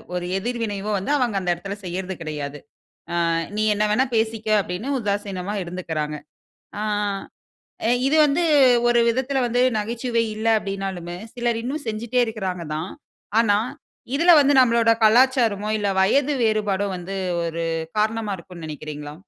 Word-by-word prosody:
ஒரு 175 Hz, 0 st, -2 dB
எதிர்வினைவோ 215 Hz, -2 st, -3 dB
வந்து 195 Hz, +10 st, -3 dB
அவங்க 240 Hz, -6 st, 0 dB
அந்த 180 Hz, -1 st, -3 dB
இடத்தில 195 Hz, +4 st, -6 dB
செய்றது 185 Hz, +1 st, -4 dB
கிடையாது. 145 Hz, -2 st, -5 dB, 0.5 s
ஆ -, -, -2 dB, 0.4 s
நீ 215 Hz, -, +1 dB
என்ன 210 Hz, +1 st, +1 dB
வேணா 260 Hz, +6 st, +3 dB
பேசிக்க 220 Hz, 0 st, -1 dB
அப்படின்னு 190 Hz, +7 st, -4 dB
உதாசீனமா 200 Hz, -2 st, -3 dB
இருந்துக்குறாங்க. 160 Hz, -4 st, -4 dB, 0.6 s
ஆ -, -, -2 dB, 1.2 s
இது 305 Hz, +3 st, +3 dB
வந்து 295 Hz, +5 st, +1 dB, 0.5 s
ஒரு 240 Hz, 0 st, +4 dB
விதத்தில 260 Hz, +3 st, 0 dB
வந்து, 245 Hz, +1 st, 0 dB, 0.2 s
நகைச்சுவை 230 Hz, +2 st, -1 dB
இல்ல. 220 Hz, +1 st, -4 dB
அப்டின்னாலுமே, 195 Hz, -4 st, -5 dB, 0.2 s
சிலர் 240 Hz, -1 st, -1 dB
இன்னும் 285 Hz, +4 st, -4 dB
செஞ்சுட்டே 235 Hz, +3 st, -1 dB
இருக்குறாங்க 190 Hz, -6 st, -4 dB
தான். 160 Hz, +4 st, -4 dB, 0.5 s
ஆனா 205 Hz, -3 st, +3 dB, 0.6 s
இதுல 340 Hz, +4 st, +6 dB
வந்து 285 Hz, 0 st, +4 dB
நம்மளோட 235 Hz, -2 st, +4 dB
கலாச்சாரமோ, 230 Hz, -3 st, +4 dB
இல்ல 205 Hz, -1 st, -1 dB
வயது 275 Hz, +9 st, +3 dB
வேறுபாடோ 205 Hz, -2 st, +1 dB
வந்து 185 Hz, +2 st, -6 dB, 0.3 s
ஒரு 165 Hz, 0 st, -3 dB, 0.4 s
காரணமா 215 Hz, -1 st, 0 dB
இருக்குன்னு 170 Hz, -1 st, -11 dB
நெனைக்கிறீங்களா? 150 Hz, -1 st, -7 dB
210 Hz, 135 wpm, -23 LUFS, 180-235 Hz, 1.2 s, இதுல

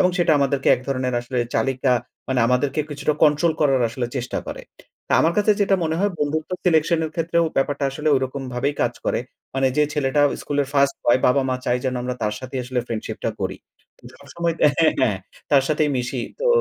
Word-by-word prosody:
এবং 180 Hz, -, +4 dB
সেটা 170 Hz, -2 st, +3 dB
আমাদেরকে 140 Hz, 0 st, +1 dB
এক 125 Hz, -, -7 dB
ধরনের 130 Hz, -2 st, -1 dB
আসলে 125 Hz, +1 st, -4 dB, 0.2 s
চালিকা 135 Hz, -1 st, +1 dB, 0.4 s
মানে 130 Hz, -2 st, +1 dB
আমাদেরকে 130 Hz, +4 st, +1 dB
কিছুটা 145 Hz, +1 st, -1 dB
কন্ট্রোল 155 Hz, +2 st, +4 dB
করার 135 Hz, -4 st, +3 dB
আসলে 120 Hz, +1 st, -3 dB
চেষ্টা 120 Hz, -1 st, -3 dB
করে। -, -, -6 dB, 0.5 s
তা -, -, -1 dB
আমার 165 Hz, +2 st, +3 dB
কাছে 210 Hz, +1 st, +4 dB
যেটা 195 Hz, -1 st, +3 dB
মনে 160 Hz, 0 st, -1 dB
হয় 205 Hz, +1 st, +1 dB
বন্ধুত্ব 155 Hz, +3 st, -2 dB
সিলেকশনের 160 Hz, -1 st, +2 dB
ক্ষেত্রেও 170 Hz, 0 st, +1 dB
ব্যাপারটা 140 Hz, +1 st, 0 dB
আসলে 150 Hz, +3 st, -2 dB
ওইরকম 130 Hz, +1 st, -3 dB
ভাবেই 135 Hz, +4 st, -1 dB
কাজ -, -, +1 dB
করে। -, -, 0 dB, 0.4 s
মানে 135 Hz, 0 st, +2 dB
যে 150 Hz, -, +4 dB
ছেলেটা 145 Hz, -1 st, +1 dB, 0.2 s
স্কুলের 145 Hz, -1 st, -1 dB
1st 140 Hz, -1 st, +3 dB
বয় 120 Hz, +2 st, +4 dB
বাবা 130 Hz, +2 st, +3 dB
মা 130 Hz, -, 0 dB
চায় 120 Hz, -, +1 dB
যেন 130 Hz, -, 0 dB
আমরা 125 Hz, 0 st, -3 dB
তার 105 Hz, 0 st, 0 dB
সাথেই 130 Hz, 0 st, -5 dB
আসলে 125 Hz, 0 st, -1 dB
ফ্রেন্ডশিপটা 110 Hz, -2 st, -4 dB
করি। -, -, -2 dB, 0.6 s
সবসময় 170 Hz, -1 st, -3 dB, 0.2 s
হ্যাঁ, 160 Hz, -1 st, +5 dB
হ্যাঁ 105 Hz, -7 st, +2 dB, 0.3 s
তার 140 Hz, -2 st, +5 dB
সাথেই 150 Hz, -1 st, +1 dB
মিশি। 125 Hz, 0 st, -2 dB, 0.2 s
তো -, -, 0 dB
140 Hz, 190 wpm, -22 LUFS, 130-155 Hz, 0.6 s, হ্যাঁ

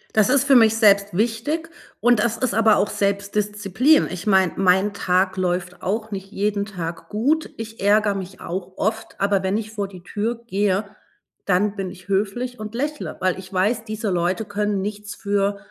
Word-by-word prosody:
Das 215 Hz, 0 st, +4 dB
ist 275 Hz, 0 st, +4 dB
für 280 Hz, -2 st, +4 dB
mich 225 Hz, -2 st, +6 dB
selbst 200 Hz, -3 st, +4 dB
wichtig 245 Hz, +9 st, -1 dB, 0.3 s
und 240 Hz, -2 st, +4 dB
das 230 Hz, 0 st, +1 dB
ist 255 Hz, -3 st, -1 dB
aber 220 Hz, 0 st, +5 dB
auch 205 Hz, -, +1 dB
Selbstdisziplin. 205 Hz, -, +1 dB
Ich 185 Hz, +2 st, -6 dB
meine, 190 Hz, -3 st, +4 dB
mein 190 Hz, +2 st, +3 dB
Tag 185 Hz, 0 st, +1 dB
läuft 180 Hz, 0 st, -2 dB
auch 215 Hz, +3 st, -2 dB
nicht 195 Hz, 0 st, -6 dB
jeden 205 Hz, -1 st, -1 dB
Tag 170 Hz, -4 st, -6 dB
gut, 285 Hz, +10 st, 0 dB
ich 225 Hz, -1 st, -8 dB
ärgere 205 Hz, +1 st, +3 dB
mich 190 Hz, -1 st, -7 dB
auch 185 Hz, +1 st, -5 dB
oft, 220 Hz, +2 st, -2 dB
aber 200 Hz, -1 st, +2 dB
wenn 190 Hz, +2 st, 0 dB
ich 220 Hz, -1 st, -5 dB
vor 205 Hz, -2 st, -3 dB
die 185 Hz, -2 st, -13 dB
Tür 225 Hz, +5 st, -3 dB
gehe, 200 Hz, -1 st, 0 dB, 0.6 s
dann 200 Hz, +2 st, +1 dB
bin 195 Hz, -2 st, -3 dB
ich 180 Hz, +2 st, -14 dB
höflich 215 Hz, +6 st, -1 dB
und 215 Hz, +1 st, -7 dB
lächele, 295 Hz, +4 st, -3 dB
weil 185 Hz, 0 st, +1 dB
ich 185 Hz, -1 st, -11 dB
weiß, 215 Hz, +5 st, 0 dB
diese 215 Hz, -2 st, -3 dB
Leute 180 Hz, +4 st, 0 dB
können 205 Hz, -1 st, -1 dB
nichts 210 Hz, +1 st, -5 dB
für 200 Hz, 0 st, 0 dB
205 Hz, 185 wpm, -22 LUFS, 190-220 Hz, 0.6 s, mich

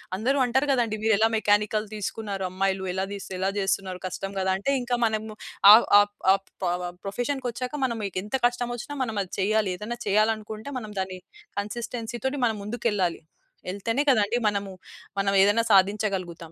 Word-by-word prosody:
అందరు 250 Hz, +8 st, 0 dB
అంటారు 260 Hz, +3 st, +1 dB
కదండీ 235 Hz, -5 st, +1 dB
మీరు 220 Hz, 0 st, +4 dB
ఎలా 220 Hz, +2 st, +4 dB
మెకానికల్ 210 Hz, 0 st, +2 dB
తీసుకున్నారు. 205 Hz, -1 st, -4 dB
అమ్మాయిలు 190 Hz, +1 st, -1 dB
ఎలా 190 Hz, +1 st, -1 dB
తిస్ 200 Hz, -1 st, -6 dB
ఎలా 190 Hz, +1 st, 0 dB
చేస్తున్నారు? 190 Hz, -1 st, -1 dB
కష్టం 195 Hz, +1 st, -4 dB
కదా! 190 Hz, 0 st, 0 dB
అంటే 200 Hz, +8 st, -1 dB
ఇంకా 245 Hz, 0 st, -1 dB
మనము 220 Hz, -1 st, -2 dB, 0.4 s
ఆ -, -, +13 dB, 0.3 s
ఆప్ 205 Hz, 0 st, +1 dB, 0.2 s
ఆప్ 195 Hz, 0 st, -3 dB, 0.2 s
పొవ 180 Hz, 0 st, -1 dB, 0.2 s
ప్రొఫెషన్‌కి 245 Hz, +6 st, -2 dB
వచ్చాక 250 Hz, +4 st, -4 dB
మనం 235 Hz, -3 st, -2 dB
మీకెంత 200 Hz, +3 st, -3 dB
కష్టమొచ్చినా 245 Hz, +2 st, -4 dB
మనం 225 Hz, -3 st, -4 dB
అది 185 Hz, -, -14 dB
చెయ్యాలి. 210 Hz, 0 st, +1 dB
ఏదైనా 225 Hz, +5 st, -5 dB
చేయాలి 215 Hz, +2 st, +3 dB
అనుకుంటే 215 Hz, +4 st, -8 dB
మనం 215 Hz, -3 st, -8 dB
దాన్ని 185 Hz, -1 st, -4 dB, 0.4 s
కన్సిస్టెన్సీతోని 240 Hz, +5 st, -4 dB
మనం 220 Hz, -2 st, 0 dB
ముందుకెళ్ళాలి. 205 Hz, -5 st, -1 dB, 0.5 s
ఎళ్తేనే 230 Hz, +8 st, -1 dB
కదండీ 220 Hz, 0 st, +2 dB
మనము 200 Hz, -1 st, -4 dB, 0.5 s
మనం 195 Hz, 0 st, +1 dB
ఏదైనా 205 Hz, +3 st, +3 dB
సాధించగలుగుతాం. 190 Hz, -4 st, +1 dB
210 Hz, 155 wpm, -26 LUFS, 195-235 Hz, 0.5 s, ఆ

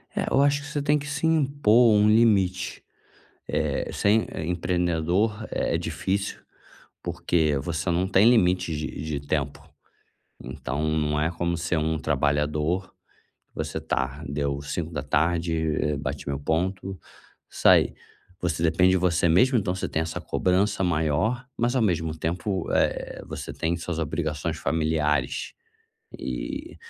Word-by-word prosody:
É, -, -, -1 dB
eu 135 Hz, -, +4 dB
acho 145 Hz, 0 st, +3 dB
que 145 Hz, -, -9 dB
você 145 Hz, 0 st, -2 dB
tem 145 Hz, +1 st, +2 dB
que 145 Hz, -, -7 dB
se 145 Hz, +2 st, -2 dB
impor 135 Hz, -7 st, +4 dB
um 105 Hz, 0 st, +5 dB
limite. 100 Hz, -5 st, +2 dB, 0.6 s
Eh, -, -, -1 dB
ser, 110 Hz, +2 st, +3 dB
eh, 80 Hz, -, -4 dB
empreendedor 90 Hz, +5 st, 0 dB
é -, -, 0 dB
difícil, 85 Hz, +4 st, -2 dB, 0.6 s
porque 85 Hz, -3 st, +1 dB
você 80 Hz, +3 st, -3 dB
não 90 Hz, +2 st, +1 dB
tem 100 Hz, +4 st, +5 dB
limite 90 Hz, -7 st, +3 dB
de 75 Hz, +1 st, -5 dB
de 80 Hz, -2 st, -3 dB
tempo. 70 Hz, 0 st, -2 dB, 0.8 s
Então, 65 Hz, +3 st, -4 dB, 0.2 s
não 75 Hz, -1 st, 0 dB
é 75 Hz, +2 st, +1 dB
como 85 Hz, 0 st, -1 dB
ser 85 Hz, 0 st, -1 dB
um 80 Hz, +1 st, 0 dB
trabalhador. 75 Hz, +5 st, 0 dB, 0.6 s
Você -, -, -3 dB
tá, 70 Hz, +3 st, -2 dB
deu 70 Hz, 0 st, -2 dB
17:00, 80 Hz, 0 st, -1 dB
bati 70 Hz, -, -5 dB
meu 70 Hz, -1 st, -2 dB
ponto 95 Hz, +5 st, -2 dB, 0.5 s
e -, -, -16 dB
saí. -, -, +5 dB, 0.5 s
Você 85 Hz, -3 st, -2 dB
depende 90 Hz, +3 st, +4 dB
de 95 Hz, -, +4 dB
você 90 Hz, -1 st, +2 dB
mesmo, 125 Hz, +11 st, +4 dB
então 100 Hz, -4 st, 0 dB
você 90 Hz, -, -3 dB
tem 80 Hz, -, 0 dB
essa 80 Hz, 0 st, -5 dB
cobrança 95 Hz, +2 st, +1 dB
maior, 90 Hz, -, 0 dB
mas 120 Hz, +2 st, +1 dB
ao 130 Hz, -, +3 dB
mesmo 80 Hz, -6 st, 0 dB
tempo, 90 Hz, +3 st, -2 dB
eh, -, -, 0 dB
você -, -, -6 dB
tem 85 Hz, +1 st, -1 dB
suas 85 Hz, 0 st, -4 dB
obrigações 75 Hz, -1 st, -2 dB
familiares. 75 Hz, -4 st, 0 dB, 0.7 s
E, -, -, -5 dB
85 Hz, 140 wpm, -25 LUFS, 75-100 Hz, 0.8 s, um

